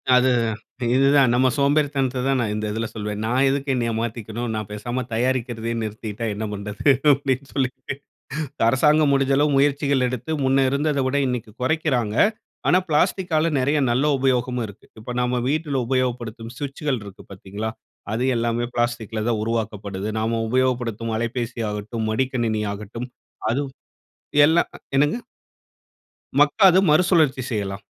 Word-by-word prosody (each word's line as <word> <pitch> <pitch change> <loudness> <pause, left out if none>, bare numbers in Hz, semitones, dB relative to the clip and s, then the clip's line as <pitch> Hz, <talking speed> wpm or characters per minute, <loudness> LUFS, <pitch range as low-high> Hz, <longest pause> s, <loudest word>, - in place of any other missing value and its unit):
அது 125 +1 +4 0.7
இதுதான் 135 -1 +5
நம்ம 130 +1 +4
சோம்பேறித்தனத்த 140 -3 +1
தான் 135 -1 +2
நான் 110 -3 -1
இந்த 105 0 -3
இதில 115 +1 -2
சொல்வேன். 105 -1 -4
நான் 125 +4 +2
எதுக்கு 140 0 0
என்னய 120 -2 0
மாத்திக்கணும். 115 0 -4
நான் 110 -2 -4
பேசாம 120 +5 -3
தயாரிக்கிறதயே 115 -1 -1
நிறுத்திட்டா 110 +1 -5
என்ன 110 +2 -4
பண்ணுறது? 105 +6 0 0.2
அப்படின்னு 135 -1 -1
சொல்லிட்டு, 130 -1 -2 0.7
அரசாங்கம் 150 +3 +4
முடிஞ்ச 135 0 +2
அளவு 150 0 +3
முயற்சிகள் 140 -2 +2
எடுத்து, 125 +4 -4
முன்ன 135 0 +3
இருந்தத 140 +1 0
விட 140 +2 +1
இன்னைக்கு 125 -4 -3
குறைக்கிறாங்க. 130 -7 0 0.5
ஆனா, 180 - +5
பிளாஸ்டிக்காலா 165 0 +2
நெறைய 145 +4 +2
நல்ல 130 +5 +2
உபயோகமும் 125 -2 0
இருக்கு. 100 +1 -14
இப்ப 120 +3 -7
நம்ம 125 0 0
வீட்ல 150 -2 0
உபயோகப்படுத்தும் 120 -3 -2
ஸ்விட்ச்சுகள் 140 -2 -2
இருக்கு 100 -2 -11
பாத்தீங்களா? 100 +3 -5 0.4
அது 115 +3 -1
எல்லாமே 120 +1 0
பிளாஸ்டிக்கில 120 -2 -1
தான் 110 -3 0
உருவாக்கப்படுது. 105 -3 -3
நாம 115 +1 0
உபயோகப்படுத்தும் 120 -3 0
அலைப்பேசி 120 +1 -3
ஆகட்டும், 110 +2 -4
மடிக்கணினி 115 -3 0
ஆகட்டும். 105 +4 -7 0.4
அதுவும் 135 +2 -2 0.7
எல்லாம் 165 +3 +3 0.3
என்னங்க? 145 +6 +3 1.2
மக்காது 190 -4 +6
மறுசுழற்சி 155 -4 +4
செய்யலாம், 100 -3 -3
125 Hz, 130 wpm, -23 LUFS, 110-140 Hz, 1.2 s, மக்காது